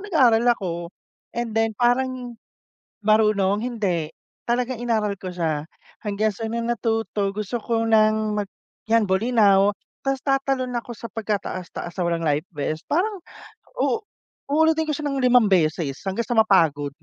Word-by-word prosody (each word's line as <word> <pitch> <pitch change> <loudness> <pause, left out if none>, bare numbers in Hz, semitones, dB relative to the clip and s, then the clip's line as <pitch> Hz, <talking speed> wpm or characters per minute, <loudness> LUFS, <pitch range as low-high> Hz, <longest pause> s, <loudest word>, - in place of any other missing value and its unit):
nag-aaral 245 - +4
ako. 185 -4 -3 0.6
And 235 -2 -2
then 225 0 +2
parang 245 -1 0 0.7
marunong? 210 -1 +3
Hindi, 185 -10 -1 0.3
talagang 245 +1 0
inaaral 215 -4 0
ko 185 -1 -6
siya. 160 -4 -1 0.4
Hanggang 210 +1 0
sa 225 - -7
nung 235 0 -2
natuto 225 -4 -1
gusto 210 +3 -4
ko 225 -1 0
ng 215 -1 +3
mag 205 -2 -2 0.4
'yan 230 -2 +4
Bolinao 200 -1 +4 0.3
ta's 270 0 0
tatalon 270 -2 0
ako 240 -1 -5
sa - - -9
pagkataas-taas 195 -5 -4
na 185 - -4
walang 170 -1 0
life 150 +2 +1
vest. 155 +2 -3
Parang 385 +4 0 0.6
u 450 - +1 0.5
uulitin 320 +1 +2
ko - - +1
siya 300 - -5
ng 275 -1 -1
5 250 -2 +5
beses 155 -6 +1
hanggang 230 +5 -2
sa 240 - -2
mapagod. 165 -10 +3
220 Hz, 145 wpm, -23 LUFS, 190-245 Hz, 0.7 s, 5